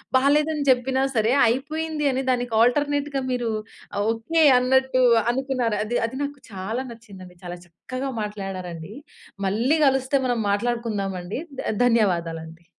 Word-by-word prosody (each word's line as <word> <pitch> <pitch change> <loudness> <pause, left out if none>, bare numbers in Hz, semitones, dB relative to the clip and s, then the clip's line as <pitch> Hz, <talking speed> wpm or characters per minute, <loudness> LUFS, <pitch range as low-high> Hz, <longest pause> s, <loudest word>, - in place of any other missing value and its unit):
బాలేదని 295 +3 +3
జెప్పినా 260 +1 +2
సరే, 220 +2 +2 0.2
అయిపోయింది 305 +4 -2
అని 260 +1 -1
దానికి 245 -2 0
ఆల్టర్నేట్‌గా 285 +3 +1
మీరు 245 -2 -1 0.6
ఓకే, 230 +9 0 0.2
అన్నట్టు 260 0 +2 0.3
అనుకున్నారు. 255 -4 -1
అది 240 +3 -1
అది 260 - -8
నాకు 285 0 -5
చాలా 210 +7 -4
నచ్చింది 210 -5 -12
అండి. 180 -1 -16
చాలా 175 0 -6
చక్కగా 255 +11 -6
మాట్లాడారండి. 195 -4 -6 0.5
మళ్ళీ 240 +11 +2
గలిస్తే 270 +1 +2
మనం 245 -2 0
మాట్లాడుకుందండి. 205 -4 -2 0.2
ద - - -2
ధన్యవాదాలండి. 170 -7 0
240 Hz, 120 wpm, -24 LUFS, 200-265 Hz, 0.6 s, బాలేదని